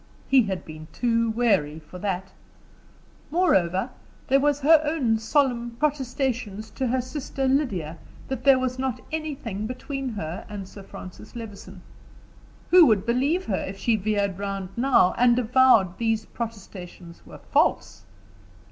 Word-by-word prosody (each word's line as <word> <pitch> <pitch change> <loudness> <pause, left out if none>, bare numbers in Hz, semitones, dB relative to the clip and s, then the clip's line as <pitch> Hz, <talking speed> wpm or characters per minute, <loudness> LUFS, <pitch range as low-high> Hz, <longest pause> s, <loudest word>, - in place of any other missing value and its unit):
He 270 -1 +6
had 190 -5 -3
been 155 0 -10
too 230 -1 +1
wary 200 -10 +1
for 160 +3 -11
that. 190 -1 -3 1.0
Moreover 230 - +2 0.4
there 270 +1 +5
was 290 0 +1
her 310 +2 +6
own 275 -8 +1
solemn 240 -1 0
protestations 255 -7 -2
to 265 - -2
her 255 +2 +1
sister 270 +1 -4
Lydia 195 - -1 0.3
that 260 -2 -4
there 275 -1 +6
was 255 0 -2
not 260 -3 -2
anything 270 -10 -4
between 270 +2 -5
her 185 -6 -5
and 200 -2 -6
Francis 190 +1 -11
Levison; 200 -5 -9 0.9
who 355 -3 +8
would 215 -3 +2
believe 275 +10 +1
her 195 - -1
if 195 +1 -7
she 225 +4 +1
veered 200 -2 -1
round 195 -2 -4
now, 245 -7 +4
and 240 0 +5
avowed 240 -6 +4
these 225 -2 0
protestations 190 -6 -8
were - - -12
false? - - +1
230 Hz, 140 wpm, -25 LUFS, 195-265 Hz, 1.0 s, who